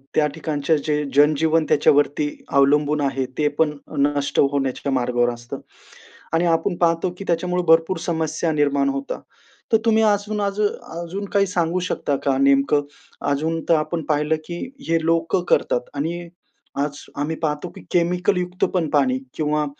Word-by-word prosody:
त्या 155 Hz, -, +4 dB
ठिकाणचे 150 Hz, 0 st, -1 dB
जे 150 Hz, 0 st, -1 dB
जन-जीवन 155 Hz, +2 st, +4 dB
त्याच्यावरती 145 Hz, 0 st, +3 dB, 0.3 s
अवलंबून 145 Hz, +2 st, +3 dB
आहे, 135 Hz, -1 st, 0 dB
ते 150 Hz, -, +2 dB
पण 160 Hz, -2 st, +4 dB, 0.3 s
नष्ट 145 Hz, 0 st, +1 dB
होण्याच्या 135 Hz, 0 st, -1 dB
मार्गावर 120 Hz, -1 st, +1 dB
असतं 120 Hz, 0 st, -8 dB, 0.7 s
आणि 165 Hz, +2 st, +2 dB
आपण 175 Hz, +3 st, 0 dB
पाहतो, 170 Hz, +1 st, +1 dB
की 195 Hz, -, -7 dB
त्याच्यामुळे 180 Hz, +1 st, 0 dB
भरपूर 165 Hz, +3 st, +4 dB
समस्या 160 Hz, -1 st, -1 dB
निर्माण 140 Hz, -2 st, +2 dB
होता. 135 Hz, 0 st, -4 dB, 0.5 s
तर 225 Hz, -, +6 dB
तुम्ही 220 Hz, 0 st, +4 dB
अजून 210 Hz, 0 st, +1 dB
अजू 200 Hz, +1 st, +1 dB, 0.4 s
अजून 195 Hz, +4 st, -5 dB
काही 200 Hz, 0 st, +4 dB
सांगू 180 Hz, -1 st, 0 dB
शकता 140 Hz, -, -1 dB
का, 135 Hz, -1 st, +2 dB
नेमकं? 140 Hz, +1 st, +4 dB, 0.5 s
अजून 160 Hz, +3 st, -1 dB
तर 165 Hz, -, +6 dB
आपण 160 Hz, +1 st, -1 dB
पाहिलं, 150 Hz, +1 st, +2 dB
की 170 Hz, 0 st, -6 dB, 0.3 s
हे 165 Hz, -, +3 dB
लोकं 165 Hz, +1 st, +1 dB
करतात 125 Hz, -, +1 dB
आणि 165 Hz, +5 st, -2 dB, 0.6 s
आज 145 Hz, -1 st, -7 dB
आम्ही 150 Hz, +3 st, -1 dB
पाहतो, 150 Hz, +2 st, -2 dB
की -, -, -10 dB
केमिकलयुक्त 180 Hz, +1 st, +1 dB
पण 165 Hz, -5 st, 0 dB
पाणी 135 Hz, -3 st, +2 dB, 0.2 s
किंवा 150 Hz, -1 st, 0 dB
155 Hz, 150 wpm, -22 LUFS, 145-175 Hz, 0.7 s, तर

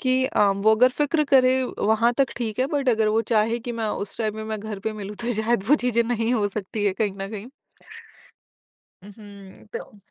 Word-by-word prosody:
कि 260 Hz, 0 st, +2 dB
अ, 210 Hz, -, +1 dB
वो 200 Hz, +3 st, +3 dB
अगर 250 Hz, +3 st, +6 dB
फिक्र 300 Hz, +1 st, +2 dB
करे 260 Hz, 0 st, +5 dB, 0.2 s
वहाँ 220 Hz, +3 st, +2 dB
तक 270 Hz, -3 st, +3 dB
ठीक 225 Hz, -2 st, -3 dB
है, 260 Hz, -, +2 dB
बट 280 Hz, -3 st, 0 dB
अगर 220 Hz, -2 st, +2 dB
वो 220 Hz, +1 st, +2 dB
चाहे 225 Hz, +2 st, +2 dB
कि 240 Hz, +1 st, -6 dB
मैं 230 Hz, -1 st, -3 dB, 0.2 s
उस 200 Hz, -, -9 dB
टाइम 215 Hz, -2 st, -2 dB
में, 220 Hz, -, -5 dB
मैं 220 Hz, -1 st, -4 dB
घर 215 Hz, -2 st, -6 dB
पे 220 Hz, +2 st, -3 dB
मिलूँ 210 Hz, -1 st, -7 dB
तो 245 Hz, -, 0 dB
शायद 225 Hz, -3 st, 0 dB
वो 295 Hz, -, +7 dB
चीज़ें 235 Hz, -1 st, +3 dB
नहीं 230 Hz, +1 st, 0 dB
हो 205 Hz, -3 st, +1 dB
सकती 205 Hz, +1 st, -4 dB
है 195 Hz, -, +2 dB
कहीं 210 Hz, -3 st, +1 dB
न 195 Hz, -, -4 dB
कहीं। 215 Hz, +1 st, -7 dB, 1.6 s
उहुँ, 200 Hz, -2 st, -14 dB
तो 210 Hz, -, -8 dB
220 Hz, 215 wpm, -23 LUFS, 210-240 Hz, 1.6 s, वो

